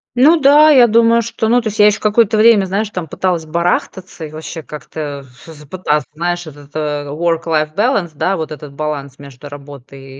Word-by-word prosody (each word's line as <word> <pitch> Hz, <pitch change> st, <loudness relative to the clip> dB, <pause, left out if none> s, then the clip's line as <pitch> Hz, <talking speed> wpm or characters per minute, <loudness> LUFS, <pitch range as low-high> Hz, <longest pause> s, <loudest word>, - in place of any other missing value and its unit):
Ну 305 Hz, +7 st, +5 dB
да, 295 Hz, +2 st, +6 dB
я 260 Hz, -5 st, +7 dB
думаю, 230 Hz, +1 st, +3 dB
что, 225 Hz, 0 st, -3 dB
ну, 245 Hz, +2 st, +4 dB
то 230 Hz, -, -3 dB
есть, 215 Hz, -, -9 dB
я 210 Hz, -, +7 dB
ещё 210 Hz, -, +1 dB
какое-то 215 Hz, 0 st, +2 dB
время, 215 Hz, -3 st, +5 dB
знаешь, 200 Hz, +3 st, -2 dB
там, 180 Hz, -5 st, -5 dB
пыталась 175 Hz, 0 st, -2 dB
барахтаться 175 Hz, +1 st, -3 dB
и 150 Hz, -, -10 dB
вообще 160 Hz, +1 st, -8 dB
как-то 150 Hz, -1 st, -7 dB
ф 125 Hz, -2 st, -20 dB
всё 165 Hz, -, -13 dB
же 150 Hz, 0 st, -15 dB
пыталась, 150 Hz, -3 st, -1 dB
знаешь, 175 Hz, +2 st, -3 dB
этот-то 145 Hz, 0 st, -5 dB
work-life 160 Hz, -1 st, -1 dB
balance, 205 Hz, -6 st, 0 dB
да, 190 Hz, +6 st, -1 dB
вот 160 Hz, -1 st, -5 dB
этот 150 Hz, -1 st, -9 dB
баланс 140 Hz, -2 st, -5 dB
между 140 Hz, 0 st, -12 dB
работой 140 Hz, -1 st, -12 dB
165 Hz, 195 wpm, -16 LUFS, 145-210 Hz, -, я